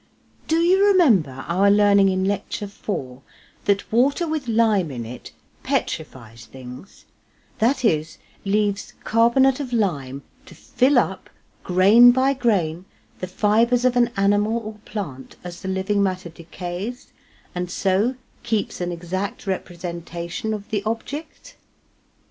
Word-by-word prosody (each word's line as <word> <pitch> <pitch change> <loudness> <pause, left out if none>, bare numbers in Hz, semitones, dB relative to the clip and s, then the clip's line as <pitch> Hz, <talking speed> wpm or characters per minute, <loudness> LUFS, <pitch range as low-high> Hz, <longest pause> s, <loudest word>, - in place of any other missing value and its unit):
Do 320 - +1
you 355 +4 +4
remember 205 - +3
our 190 +4 +3
learning 200 -1 +5
in 190 0 0
Lecture 205 +1 -2
IV, 140 -11 -6 0.5
that 200 0 0
water 275 +9 +2
with 310 -4 -3
lime 220 -6 +2
in 120 -4 -6
it 120 +2 -9 0.3
petrifies 115 -2 -4
things, 130 +7 -12 0.5
that 250 +3 +1
is, 155 -5 0 0.3
leaves 205 0 -1
carbonate 245 +4 +3
of 270 -4 -5
lime 140 - -1 0.2
to - - -13
fill 260 +2 +1
up 190 -6 0 0.3
grain 200 +7 +6
by 260 +2 +3
grain 185 - 0 0.3
the 185 - -4
fibres 230 +6 +2
of 250 -1 +3
an 240 -1 +3
animal 205 +3 +2
or 215 - -6
plant 145 -12 -7
as 175 -1 -8
the 190 - -6
living 190 +2 0
matter 185 -2 -1
decays, 175 +7 -7 0.4
and 180 0 -4
so 195 +7 +1 0.3
keeps 215 -4 -2
an 175 0 -2
exact 180 +4 -4
representation 175 +2 -5
of 205 -1 -10
the 210 -2 0
object? 280 +8 -6
200 Hz, 130 wpm, -22 LUFS, 175-235 Hz, 0.5 s, grain